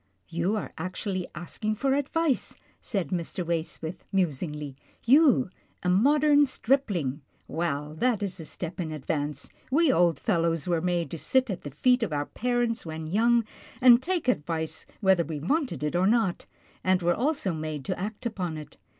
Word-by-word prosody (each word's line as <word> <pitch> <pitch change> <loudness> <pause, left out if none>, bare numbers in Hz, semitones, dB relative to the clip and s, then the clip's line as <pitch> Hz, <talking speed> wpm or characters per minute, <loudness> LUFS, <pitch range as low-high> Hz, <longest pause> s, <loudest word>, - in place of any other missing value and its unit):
" 90 - -45
You 185 +6 +1
are 210 - -4
actually 185 +1 -3
asking 215 +6 -3
for 270 +4 +1
advice," 285 +1 0 0.2
said 190 -9 -2
Mr. 175 0 -3
•Waysmith, 165 0 -3
musingly, 150 -5 -1 0.2
" - - -35
you, 275 - +5 0.3
a 180 - +1
modern 290 +8 +5
stripling. 200 - 0 0.3
Well, 150 -3 -2
that 240 -5 +2
is 190 -2 -4
a 160 - -7
step 175 +3 -6
in 165 -3 -2
advance. 150 0 -3 0.2
We 295 +1 +4
old 170 - +3
fellows 165 -5 0
were 170 -2 +1
made 175 -1 -1
to 165 - -5
sit 260 - +2
at 185 - -4
the 145 - -6
feet 250 - +2
of 205 -9 -1
our 145 0 0
parents 240 +1 -1
when 160 -1 -6
young, 230 +7 +3 0.3
and 250 -1 +7
take 350 -2 -2
advice 160 -7 -1
whether 190 -4 +4
we 160 -2 -5
wanted 180 - -1
it 150 +2 -1
or 180 +2 +3
not, 220 -5 +1 0.4
and 185 -1 +2
were 175 +1 +3
also 265 - 0
made 155 -3 -4
to - - -2
act 210 +5 -5
upon 185 -8 -3
it. 150 - -10
180 Hz, 175 wpm, -27 LUFS, 160-240 Hz, 0.4 s, and